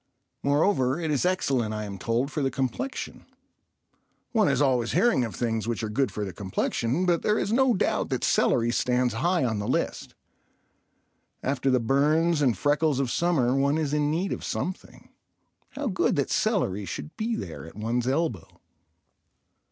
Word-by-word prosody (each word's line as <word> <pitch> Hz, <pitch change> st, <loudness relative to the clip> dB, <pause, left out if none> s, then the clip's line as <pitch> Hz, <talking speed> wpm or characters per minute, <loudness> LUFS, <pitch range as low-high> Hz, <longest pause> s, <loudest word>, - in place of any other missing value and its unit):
Moreover 140 Hz, -1 st, +2 dB
it 160 Hz, -2 st, -2 dB
is 145 Hz, +4 st, +1 dB
excellent, 130 Hz, -, 0 dB
I 105 Hz, -, -3 dB
am 100 Hz, -2 st, -7 dB
told, 120 Hz, +7 st, -1 dB
for 150 Hz, -, -2 dB
the 135 Hz, -, +1 dB
complexion. 135 Hz, -, -4 dB, 1.0 s
One 220 Hz, -5 st, +3 dB
is 140 Hz, -2 st, +1 dB
always 125 Hz, -5 st, +2 dB
hearing 190 Hz, -, +3 dB
of 115 Hz, -, -4 dB
things 115 Hz, -3 st, -1 dB
which 120 Hz, -1 st, -2 dB
are 110 Hz, -, -2 dB
good 135 Hz, +4 st, 0 dB
for 105 Hz, -, -3 dB
the 95 Hz, -, -6 dB
complexion, 115 Hz, -, -1 dB
but 175 Hz, -2 st, +2 dB
there 210 Hz, 0 st, +1 dB
is 205 Hz, -, -1 dB
no 260 Hz, -1 st, +4 dB
doubt -, -, 0 dB
that -, -, -2 dB
celery 120 Hz, 0 st, +2 dB
stands 125 Hz, 0 st, +1 dB
high 170 Hz, +5 st, +1 dB
on 110 Hz, -3 st, -1 dB
the 105 Hz, -, -3 dB
list. -, -, -2 dB, 1.3 s
After 135 Hz, 0 st, 0 dB
the 130 Hz, -1 st, +3 dB
burns 150 Hz, +6 st, +2 dB
and 125 Hz, -8 st, +2 dB
freckles 145 Hz, +2 st, +1 dB
of 130 Hz, -3 st, 0 dB
summer 150 Hz, -8 st, +2 dB
one 140 Hz, +2 st, +2 dB
is 150 Hz, -3 st, -1 dB
in 150 Hz, -1 st, +1 dB
need 175 Hz, +6 st, -1 dB
of -, -, -6 dB
something. 185 Hz, +1 st, -5 dB, 0.6 s
How 290 Hz, +1 st, -4 dB
good 195 Hz, -7 st, +1 dB
that 140 Hz, -, -1 dB
celery 140 Hz, -, 0 dB
should 150 Hz, -, -7 dB
be 225 Hz, +1 st, -1 dB
there 85 Hz, -, -6 dB
at 80 Hz, -, -13 dB
one's 115 Hz, +3 st, -1 dB
elbow. 135 Hz, -, -2 dB
135 Hz, 175 wpm, -26 LUFS, 115-170 Hz, 1.3 s, no